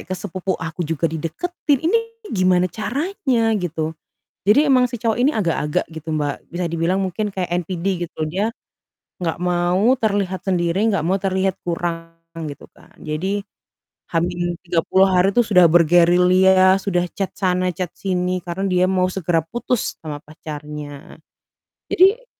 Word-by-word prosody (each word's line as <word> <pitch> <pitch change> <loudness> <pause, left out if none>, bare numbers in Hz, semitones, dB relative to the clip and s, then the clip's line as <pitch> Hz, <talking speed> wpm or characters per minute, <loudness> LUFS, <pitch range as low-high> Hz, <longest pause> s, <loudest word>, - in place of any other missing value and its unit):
ke 185 - -5
sepupu 190 0 -3
aku 165 0 -6
juga 165 0 -2
dideketin? 260 - -1
Ini 370 +8 +3 0.3
gimana 185 -2 +3
caranya 245 - 0
gitu. 160 -3 -3 0.5
Jadi 280 +9 +5
emang 255 -3 +4
si 240 - -4
cowok 225 0 0
ini 270 +4 +4
agak-agak 165 -7 0
gitu, 160 0 -9
Mbak. 145 -2 -3
Bisa 175 +1 -3
dibilang 170 +3 0
mungkin 190 +3 -2
kayak 180 -3 -3
NPD 175 +1 -5 0.2
gitu. 165 - -13
Dia 195 +8 -1 0.7
enggak 165 -3 -2
mau 180 +5 +2
terlihat 200 -4 0
sendiri, 175 0 +1
enggak 200 -8 +1
mau 190 +4 +1
terlihat 190 -1 0
kurang 170 -1 -3 0.4
gitu 145 - -9
kan. - - -21
Jadi 190 +7 -2 0.7
H-30 175 +2 +1
hari 185 +1 +3
itu 240 - +4
sudah 190 -6 +5
bergerilya, 180 +3 +5
sudah 180 -3 0
chat 195 +1 -4
sana, 185 -1 0
chat 180 0 -3
sini 185 -1 -1
karena 175 +2 -4
dia 180 0 +3
mau 185 -1 +1
segera 175 -3 0
putus 240 +7 -2
sama 150 -2 -6
pacarnya. 150 -2 -9 0.7
Jadi 410 +7 +4
180 Hz, 140 wpm, -21 LUFS, 170-195 Hz, 0.7 s, Jadi